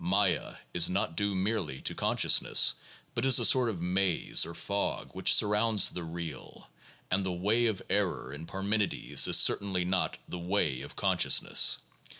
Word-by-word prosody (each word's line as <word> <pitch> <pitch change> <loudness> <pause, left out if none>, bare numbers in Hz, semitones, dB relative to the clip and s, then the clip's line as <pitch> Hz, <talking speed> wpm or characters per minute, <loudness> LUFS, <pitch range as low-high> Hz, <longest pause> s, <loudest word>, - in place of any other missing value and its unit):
Maya 95 0 0 0.2
is 85 -1 +3
not 90 -3 -2
due 100 +1 -1
merely 95 -7 -3
to - - -2
consciousness, - - +2 0.4
but 115 - -3
is 135 0 +5
a 120 - +4
sort 125 -1 +4
of 90 -6 -6
maze 90 0 +1
or 85 - -9
fog 100 0 -4
which - - +1
surrounds 105 +1 +3
the 90 - -7
real, 80 -3 -9 0.4
and 95 +2 0
"the 95 - -3
way 105 +7 0
of 105 -4 -4
error" - - -2
in 80 +3 -9
Parmenides 100 +2 0
is - - +5
cer - - +6
tainly 95 -3 -4
not 90 0 -2
"the 90 - -7
way 85 -7 -1
of 70 - -11
consciousness." - - +3
95 Hz, 165 wpm, -29 LUFS, 85-105 Hz, 0.4 s, cer